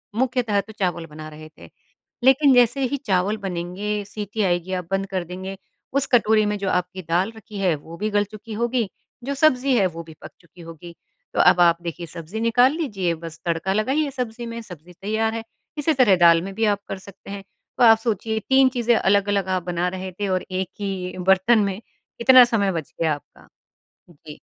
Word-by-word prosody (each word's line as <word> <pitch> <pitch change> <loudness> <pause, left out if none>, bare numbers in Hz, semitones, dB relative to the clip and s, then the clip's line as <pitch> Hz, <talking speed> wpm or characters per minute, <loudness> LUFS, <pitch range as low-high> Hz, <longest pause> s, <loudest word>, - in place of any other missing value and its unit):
मुख्यतः 240 -5 +1
तो 220 - -14
चावल 175 -3 -1
बना 155 0 -10
रहे 155 0 -12
थे। - - -13 0.5
लेकिन 270 +1 +5
जैसे 245 +2 +4
ही - - +1
चावल 195 +2 +1
बनेंगे, 190 +4 -3
सीटी 205 +1 -4
आएगी, 175 0 0
आप 180 -2 -3
बंद 195 0 -1
कर 180 - 0
देंगे, 190 +2 -7 0.4
उस 275 -1 +1
कटोरी 220 -2 +4
में 210 0 -1
जो 195 -1 -2
आपकी 180 +1 -2
दाल 185 +6 +1
रखी 210 -2 -9
है 180 -5 +2
वो 165 +3 -11
भी 215 +1 -2
गल 205 0 +2
चुकी 215 +1 -9
होगी, 235 -1 -1 0.3
जो 280 +2 -2
सब्ज़ी 270 -3 +3
है 195 - +3
वो 170 -1 -8
भी 160 -1 -13
पक - - -10
चुकी 170 +1 -17
होगी। 165 +1 -11 0.4
तो - - -2
अब 175 - +5
आप 170 -1 +5
देखिए 170 0 -5
सब्ज़ी 170 +6 -7
निकाल 245 +3 +4
लीजिए, 195 - -1
बस 165 0 -10
तड़का 170 +3 -1
लगाइए 275 +7 0
सब्ज़ी 240 -2 -5
में, 230 0 -6
सब्ज़ी 180 -4 -13
तैयार 220 +4 -1
है। 225 0 -4 0.3
इसी 305 +2 +1
तरह 245 -8 +5
दाल 170 -1 +6
में 195 +2 -6
भी 225 0 +1
आप 205 -1 +1
कर 195 - -5
सकते 195 +1 -14
हैं। 200 -1 -7 0.3
तो - - +3
आप 225 -1 +8
सोचिए 220 -1 -2
3 265 0 +5
चीज़ें 240 -1 +2
अलग-अलग 200 -1 +2
आप 180 - -5
बना 175 0 -1
रहे 185 0 -6
थे 205 - -1
और 185 -1 -1
1 185 0 -2
ही 190 -2 -4
बर्तन 190 +4 +5
में 200 +2 -3 0.4
इतना 255 0 +8
समय 205 -5 +1
बच 165 -4 -5
गया 160 -2 +2
आपका। 145 - -18 0.6
जी। 150 -1 -13
200 Hz, 205 wpm, -22 LUFS, 180-230 Hz, 0.6 s, आप